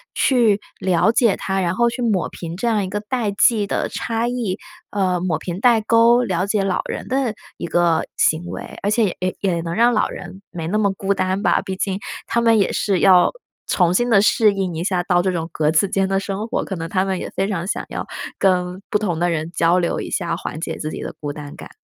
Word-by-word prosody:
去 230 Hz, -6 st, +3 dB, 0.2 s
了 185 Hz, +3 st, +3 dB
解 230 Hz, -3 st, +3 dB
他， 190 Hz, 0 st, -1 dB
然 175 Hz, 0 st, 0 dB
后 235 Hz, +2 st, +3 dB
去 250 Hz, -, -5 dB
抹 215 Hz, -7 st, +1 dB
平 170 Hz, 0 st, -7 dB
这 235 Hz, -, -1 dB
样 215 Hz, -3 st, +2 dB
一 185 Hz, -, -4 dB
个 205 Hz, -, -2 dB
代 225 Hz, 0 st, -2 dB
际 205 Hz, +1 st, +3 dB
的 -, -, -1 dB
差 230 Hz, 0 st, -2 dB
异， 240 Hz, -6 st, -2 dB, 0.3 s
呃， 185 Hz, -3 st, 0 dB
抹 175 Hz, -2 st, -1 dB
平 175 Hz, 0 st, -5 dB
代 235 Hz, 0 st, +5 dB
沟， 230 Hz, +2 st, +4 dB
了 185 Hz, -4 st, 0 dB
解 205 Hz, -1 st, +1 dB
老 190 Hz, -2 st, 0 dB
人 -, -, -5 dB
的 260 Hz, -3 st, 0 dB, 0.2 s
一 170 Hz, -, -4 dB
个 170 Hz, -1 st, +2 dB
行 160 Hz, +2 st, +2 dB
为。 -, -, -7 dB
而 200 Hz, -, 0 dB
且 210 Hz, -3 st, +1 dB
也 185 Hz, 0 st, -2 dB
也 180 Hz, -4 st, 0 dB
能 165 Hz, 0 st, -4 dB
让 235 Hz, +3 st, +4 dB
老 220 Hz, -, +2 dB
人 190 Hz, +1 st, -9 dB
没 165 Hz, -2 st, -6 dB
那 200 Hz, +5 st, 0 dB
么 200 Hz, -2 st, +2 dB
孤 195 Hz, +1 st, -1 dB
单 190 Hz, +1 st, -1 dB
吧， -, -, +3 dB
毕 190 Hz, -, -5 dB
竟 190 Hz, 0 st, -2 dB, 0.3 s
他 235 Hz, -, 0 dB
们 230 Hz, -1 st, +4 dB
也 200 Hz, -, +2 dB
是 195 Hz, -3 st, +1 dB
要 185 Hz, -2 st, +6 dB, 0.4 s
重 175 Hz, -2 st, +2 dB
新 240 Hz, +6 st, +1 dB
地 205 Hz, -4 st, +5 dB
适 215 Hz, 0 st, +4 dB
应 190 Hz, -3 st, -2 dB
一 165 Hz, -, -3 dB
下 180 Hz, -1 st, 0 dB
到 175 Hz, -1 st, +2 dB
这 190 Hz, -, 0 dB
种 165 Hz, -2 st, -3 dB
格 150 Hz, -2 st, +1 dB
子 160 Hz, +5 st, +3 dB
间 195 Hz, 0 st, +1 dB
的 195 Hz, 0 st, +1 dB
生 200 Hz, +2 st, -4 dB
活， -, -, -1 dB
可 195 Hz, -, -4 dB
能 165 Hz, 0 st, -4 dB
他 185 Hz, +1 st, +1 dB
们 190 Hz, -2 st, -1 dB
也 -, -, -5 dB
非 195 Hz, -, 0 dB
常 180 Hz, -3 st, -3 dB
想 -, -, -2 dB
要 -, -, -5 dB, 0.3 s
跟 180 Hz, -1 st, +1 dB
不 215 Hz, -, +2 dB
同 185 Hz, -6 st, -2 dB
的 175 Hz, +1 st, +2 dB
人 160 Hz, 0 st, -2 dB
交 170 Hz, 0 st, +2 dB
流 175 Hz, -2 st, 0 dB
一 -, -, -6 dB
下， 170 Hz, -3 st, -1 dB
缓 155 Hz, -, -6 dB
解 -, -, -4 dB
自 155 Hz, -, -4 dB
己 -, -, -6 dB
的 -, -, -5 dB
孤 145 Hz, -1 st, -4 dB
单 145 Hz, -1 st, -9 dB
感。 -, -, -10 dB
190 Hz, 260 characters per minute, -20 LUFS, 175-215 Hz, 0.4 s, 要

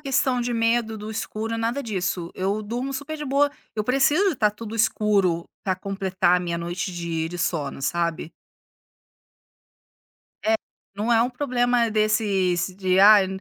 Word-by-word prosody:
questão 260 Hz, -2 st, +1 dB
de 240 Hz, 0 st, -2 dB
medo 230 Hz, -1 st, +1 dB
do 210 Hz, +1 st, -7 dB
escuro 225 Hz, +1 st, -4 dB
nada 235 Hz, +5 st, -1 dB
disso 185 Hz, -6 st, -3 dB
eu 200 Hz, +3 st, -1 dB
durmo 240 Hz, +6 st, -3 dB
super 285 Hz, +4 st, -5 dB
de 300 Hz, -, -5 dB
boa, 285 Hz, +1 st, +2 dB, 0.3 s
eu 215 Hz, -, +1 dB
preciso 285 Hz, -, +3 dB
de 315 Hz, -, -4 dB
tá 210 Hz, -3 st, +3 dB
tudo 215 Hz, +1 st, -8 dB
escuro 200 Hz, -6 st, +2 dB, 0.2 s
pra 190 Hz, -, +1 dB
completar 190 Hz, -2 st, +1 dB
a -, -, -1 dB
minha 170 Hz, -1 st, -3 dB
noite 175 Hz, +2 st, -4 dB
de 170 Hz, -2 st, -3 dB
de 175 Hz, +1 st, -7 dB
sono, 150 Hz, -6 st, -2 dB
sabe. 170 Hz, +1 st, -1 dB, 2.1 s
É. 220 Hz, +1 st, +3 dB, 0.4 s
Não 215 Hz, +4 st, 0 dB
é 230 Hz, 0 st, +5 dB
um 245 Hz, -, -1 dB
problema 245 Hz, -3 st, +1 dB
desses 205 Hz, -4 st, +1 dB
de: 185 Hz, -1 st, +1 dB
"Ai, 200 Hz, 0 st, +8 dB
215 Hz, 155 wpm, -24 LUFS, 185-240 Hz, 2.1 s, Ai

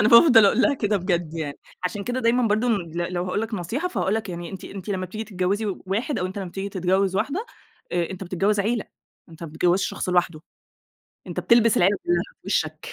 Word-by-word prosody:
أنا 215 Hz, -, +4 dB
بافضل 235 Hz, -1 st, +8 dB
أقول 215 Hz, +5 st, +3 dB
لها 290 Hz, -, +4 dB
كده 210 Hz, -5 st, 0 dB
بجد 175 Hz, -4 st, -1 dB
يعني. 150 Hz, -4 st, -4 dB, 0.3 s
عشان 200 Hz, +2 st, -2 dB
كده 245 Hz, +3 st, -2 dB
دايمًا 235 Hz, 0 st, +3 dB
برضه 215 Hz, +4 st, +1 dB
ن -, -, +4 dB
ل 170 Hz, -1 st, -4 dB
لو 175 Hz, 0 st, -1 dB
هاقول 185 Hz, +3 st, -1 dB
لك 225 Hz, 0 st, -3 dB
نصيحة، 225 Hz, -, -2 dB
فهاقول 210 Hz, -, 0 dB
لك 220 Hz, -2 st, -2 dB
يعني 175 Hz, -1 st, -6 dB
أنتِ 190 Hz, -, -8 dB
أنتِ 195 Hz, 0 st, -8 dB
لمّا 185 Hz, -2 st, -2 dB
بتيجي 215 Hz, +5 st, -6 dB
تتجوِّزي 200 Hz, +1 st, -1 dB, 0.2 s
واحد 225 Hz, +10 st, -1 dB
أو 180 Hz, -, -1 dB
أنت 190 Hz, +2 st, -6 dB
لمّا 190 Hz, -2 st, -4 dB
بتيجي 195 Hz, +3 st, -4 dB
تتجوِّز 190 Hz, 0 st, +1 dB
واحدة، 290 Hz, -, -1 dB, 0.5 s
آآ 175 Hz, -1 st, 0 dB
أنت 190 Hz, 0 st, -6 dB
بتتجوِّز 195 Hz, +3 st, +1 dB
عيلة، 225 Hz, +2 st, 0 dB, 0.4 s
أنت 165 Hz, 0 st, -13 dB
ما 165 Hz, -, -5 dB
بتتجوِّزش 175 Hz, +4 st, +1 dB
شخص -, -, -4 dB
لوحده، 175 Hz, -3 st, +1 dB, 0.9 s
أنت -, -, -3 dB
بتلبس 230 Hz, -2 st, +4 dB
العيلة 195 Hz, +3 st, +4 dB
كُلّها 350 Hz, 0 st, +2 dB, 0.2 s
في -, -, -20 dB
وِشّك. 460 Hz, -, -1 dB
195 Hz, 220 wpm, -24 LUFS, 180-225 Hz, 0.9 s, بافضل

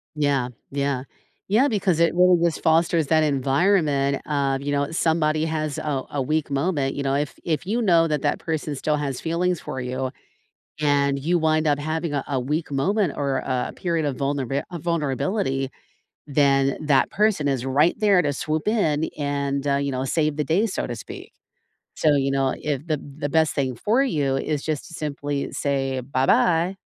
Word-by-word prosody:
Yeah. 140 Hz, -4 st, +1 dB, 0.2 s
Yeah. 140 Hz, -2 st, -1 dB, 0.5 s
Yeah, 240 Hz, +7 st, +4 dB
because 190 Hz, -6 st, +1 dB
it 170 Hz, 0 st, +3 dB
really 180 Hz, -1 st, +5 dB
just 170 Hz, -, 0 dB
fosters 160 Hz, -1 st, +3 dB
that 160 Hz, +1 st, +3 dB
environment 140 Hz, 0 st, +2 dB
of, 140 Hz, -2 st, 0 dB
you 145 Hz, +1 st, -3 dB
know, 140 Hz, +1 st, 0 dB
somebody 160 Hz, -1 st, +1 dB
has 155 Hz, -2 st, -2 dB
a 140 Hz, -3 st, -2 dB
a 145 Hz, -, -2 dB
weak 155 Hz, +2 st, -1 dB
moment, 140 Hz, -1 st, 0 dB
you 140 Hz, -, -3 dB
know, 135 Hz, 0 st, 0 dB
if 145 Hz, 0 st, -2 dB
if 165 Hz, +1 st, -1 dB
you 230 Hz, +4 st, 0 dB
know 170 Hz, -6 st, +4 dB
that 150 Hz, -2 st, 0 dB
that -, -, +1 dB
person 155 Hz, -2 st, -3 dB
still 150 Hz, +2 st, 0 dB
has 140 Hz, -3 st, -3 dB
feelings 170 Hz, +1 st, 0 dB
for 130 Hz, -, -5 dB
you 130 Hz, +1 st, -3 dB, 0.7 s
and 140 Hz, -1 st, +2 dB
you 170 Hz, +5 st, +1 dB
wind 155 Hz, 0 st, +2 dB
up 145 Hz, -1 st, +2 dB
having 155 Hz, +1 st, -2 dB
a 140 Hz, -, -1 dB
a 135 Hz, -3 st, 0 dB
weak 150 Hz, +5 st, -2 dB
moment 185 Hz, +5 st, +1 dB
or 140 Hz, -2 st, 0 dB
a 130 Hz, -2 st, -2 dB
period 165 Hz, -4 st, -1 dB
of 135 Hz, -, -2 dB
vulnerabi 140 Hz, 0 st, -1 dB
of 170 Hz, -3 st, -6 dB
vulnerability, 150 Hz, -3 st, -1 dB, 0.6 s
then 140 Hz, -1 st, +2 dB
that 140 Hz, -3 st, +3 dB
person 205 Hz, -8 st, +1 dB
is 130 Hz, -2 st, -1 dB
right 145 Hz, +6 st, +2 dB
there 200 Hz, -4 st, +4 dB
to 145 Hz, -2 st, 0 dB
swoop 155 Hz, +6 st, -2 dB
in 160 Hz, -9 st, +1 dB
and, 140 Hz, -1 st, -2 dB
uh, 140 Hz, -, +2 dB
you 140 Hz, 0 st, -1 dB
know, 130 Hz, 0 st, -2 dB
save 150 Hz, +1 st, 0 dB
the 150 Hz, -, +1 dB
day, 190 Hz, +9 st, +2 dB
so 200 Hz, -, -3 dB
to 120 Hz, -, -4 dB
speak. 110 Hz, -, -10 dB, 0.6 s
So, 150 Hz, -2 st, +3 dB
you 135 Hz, -1 st, +1 dB
know, 135 Hz, -1 st, +1 dB
if 150 Hz, +1 st, -3 dB
the 155 Hz, -2 st, 0 dB, 0.2 s
the 145 Hz, -, -2 dB
best 160 Hz, +1 st, +2 dB
thing 130 Hz, -3 st, -1 dB
for 235 Hz, +6 st, +2 dB
you 145 Hz, -, 0 dB
is 145 Hz, +1 st, -2 dB
just 155 Hz, -3 st, -3 dB
to 170 Hz, -, -12 dB
simply 145 Hz, -2 st, -3 dB
say, 135 Hz, -2 st, -1 dB
"Bye-bye." 160 Hz, +8 st, +2 dB
145 Hz, 185 wpm, -23 LUFS, 140-165 Hz, 0.7 s, really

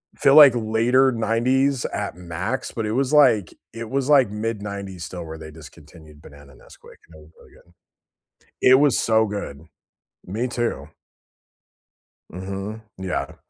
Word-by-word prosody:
I -, -, -29 dB
feel 140 Hz, 0 st, +4 dB
like 145 Hz, -4 st, +9 dB
later 120 Hz, +4 st, +2 dB
90s 125 Hz, +4 st, 0 dB
at -, -, -4 dB
max, 90 Hz, +7 st, -5 dB
but 115 Hz, -, -4 dB
it 105 Hz, -, -3 dB
was 130 Hz, +3 st, -1 dB
like 125 Hz, -, +4 dB, 0.2 s
it 115 Hz, -1 st, -7 dB
was 135 Hz, +1 st, -2 dB
like 135 Hz, -7 st, +5 dB
mid 105 Hz, 0 st, -4 dB
90s 100 Hz, -4 st, -7 dB
still 90 Hz, -2 st, -8 dB
where 80 Hz, 0 st, -8 dB
they 80 Hz, -, -10 dB
discontinued 75 Hz, -1 st, -16 dB
banana 70 Hz, -2 st, -16 dB
Nesquik, -, -, -18 dB
it -, -, -16 dB
was 75 Hz, +1 st, -18 dB
really -, -, -20 dB
good. 85 Hz, -, -23 dB, 0.9 s
It 130 Hz, -, +6 dB
was 145 Hz, -3 st, +3 dB
so 110 Hz, -1 st, +2 dB
good, 100 Hz, -8 st, -6 dB, 0.6 s
me 110 Hz, +7 st, -3 dB
too. 120 Hz, -1 st, -3 dB, 1.4 s
Mhm, 95 Hz, +4 st, -7 dB, 0.2 s
yeah. 95 Hz, -1 st, -4 dB
110 Hz, 150 wpm, -22 LUFS, 85-125 Hz, 1.4 s, like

